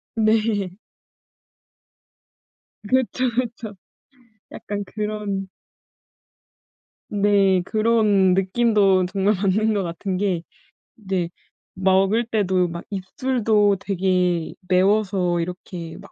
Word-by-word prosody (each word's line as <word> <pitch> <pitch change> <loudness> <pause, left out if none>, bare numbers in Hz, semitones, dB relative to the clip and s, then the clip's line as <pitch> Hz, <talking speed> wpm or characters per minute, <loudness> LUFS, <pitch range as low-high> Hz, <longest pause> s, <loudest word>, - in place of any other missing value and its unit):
네. 215 -4 +1 2.1
그쵸, 260 0 +1
그쵸. 235 -4 -3 0.8
약간 205 0 -5
그런 210 -1 -4 1.6
네. 200 -2 +3
그런 215 -4 +3
느낌도 195 -1 +3
정말 195 +3 +1
맞는 210 +3 +1
것 200 -2 0
같은 180 +2 -4
게 185 -3 0 0.5
네. 190 -5 -3 0.5
먹을 190 +4 +2
때도 190 -5 +1
막 170 0 -7
입술도 210 0 +1
되게 180 -3 0
매워서 185 -1 +2
이렇게 170 -1 -6
막 - - -14
195 Hz, 155 characters per minute, -22 LUFS, 185-215 Hz, 2.1 s, 네